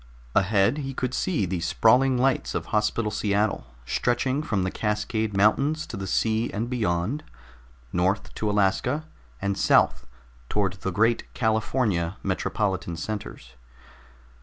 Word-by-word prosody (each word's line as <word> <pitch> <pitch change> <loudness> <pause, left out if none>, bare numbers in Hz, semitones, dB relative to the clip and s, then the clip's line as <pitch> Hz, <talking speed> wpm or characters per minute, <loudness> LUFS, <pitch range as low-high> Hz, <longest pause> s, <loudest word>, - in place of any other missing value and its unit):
Ahead 100 +7 +3
he 135 -2 -5
could 130 -1 -2
see 160 - 0
the 90 0 -2
sprawling 125 +9 +3
lights 130 +1 +1
of - - -2
Hospital 105 +1 +1
Seattle, 105 - 0 0.2
stretching 130 - 0
from 105 -10 -1
the 95 - -1
Cascade 105 -1 -1
Mountains 140 +10 +3
to - - -7
the 95 -1 -5
sea 110 +4 +1
and 115 +4 -3
beyond, 110 - -1 0.7
north 95 +3 0
to 105 - -2
Alaska 105 +9 +1 0.4
and 100 0 0
south - - +3 0.4
toward 100 -4 0
the - - -1
great 115 +5 +1
California 110 -5 0
metropolitan 95 -2 -1
centers. 90 - -6
105 Hz, 130 wpm, -25 LUFS, 95-120 Hz, 0.7 s, Ahead